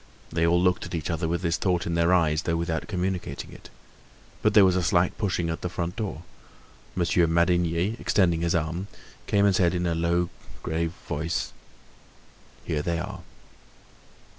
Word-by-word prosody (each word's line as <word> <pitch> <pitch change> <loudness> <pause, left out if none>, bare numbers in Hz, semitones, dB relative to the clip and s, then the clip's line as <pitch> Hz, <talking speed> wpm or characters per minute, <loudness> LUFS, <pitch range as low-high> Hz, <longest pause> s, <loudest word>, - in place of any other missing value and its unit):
They 85 0 +2
all 85 +1 +4
looked 90 0 +1
at - - -5
each 80 0 -2
other 80 0 -1
with 85 +3 -2
this 85 -1 +1
thought 90 -3 0
in 85 - -2
their 85 +1 +3
eyes, 80 -4 +3
though 85 -1 -1
without 85 -1 -2
communicating 95 -2 -3
it. - - -13 0.7
But 110 -1 +2
there 105 -2 +8
was 95 -1 +3
a 95 - +2
slight 85 +1 +2
pushing 90 -5 0
at 80 - -5
the 90 - -2
front 85 0 -3
door. 105 -7 -4 0.7
Monsieur 85 -1 +2
Madinier, 85 +4 +1
extending 85 -4 +2
his 85 0 +1
arms, 85 +4 -2 0.4
came 100 0 +3
and 100 -2 +4
said 90 -1 +3
in 90 0 -1
a 85 - +1
low 85 +1 +1 0.3
grave 80 +1 -1
voice: 80 +3 -2 1.1
"Here 75 -2 -1
they 85 +2 -1
are!" 95 +2 -5
85 Hz, 175 wpm, -26 LUFS, 85-90 Hz, 1.1 s, there